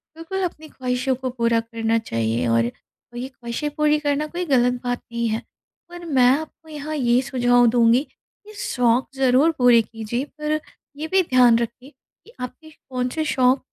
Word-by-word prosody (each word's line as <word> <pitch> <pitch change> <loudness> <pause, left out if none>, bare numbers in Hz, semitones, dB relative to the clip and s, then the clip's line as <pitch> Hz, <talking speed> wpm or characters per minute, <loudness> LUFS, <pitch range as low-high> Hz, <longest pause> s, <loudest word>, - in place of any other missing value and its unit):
बिल्कुल 330 +4 -4
अपनी 315 -3 -5
ख्वाहिशों 255 0 -1
को 260 +1 -4
पूरा 235 -2 +1
करना 230 0 -1
चाहिए 115 - -1
और, 115 0 +3 0.5
ये 245 +2 -4
ख्वाहिशें 255 +2 -5
पूरी 300 0 +3
करना 290 0 0
कोई 350 +3 -4
गलत 250 -5 +3
बात 245 0 -1
नहीं 235 0 -1
है, 220 +1 -1 0.5
पर 350 0 -9
मैं 260 -6 +4
आपको 315 0 -10
यहाँ 305 0 -5
ये 245 -3 +2
सुझाव 245 -1 +3
दूँगी 235 +1 +4
कि 420 +6 -20
शौक़ 245 -6 +1
ज़रूर 265 +4 +4
पूरे 245 -2 +6
कीजिए 225 +3 -4 0.2
पर 305 0 0 0.4
ये 310 +2 -4
भी 380 +3 +3
ध्यान 250 -6 +5
रखिए, 235 +3 -5
कि 290 - -24
आपके 250 +6 -8
कौन 255 -4 -4
से 315 +5 -2
शौक़ 255 -2 +3
255 Hz, 170 wpm, -22 LUFS, 235-300 Hz, 0.5 s, पूरे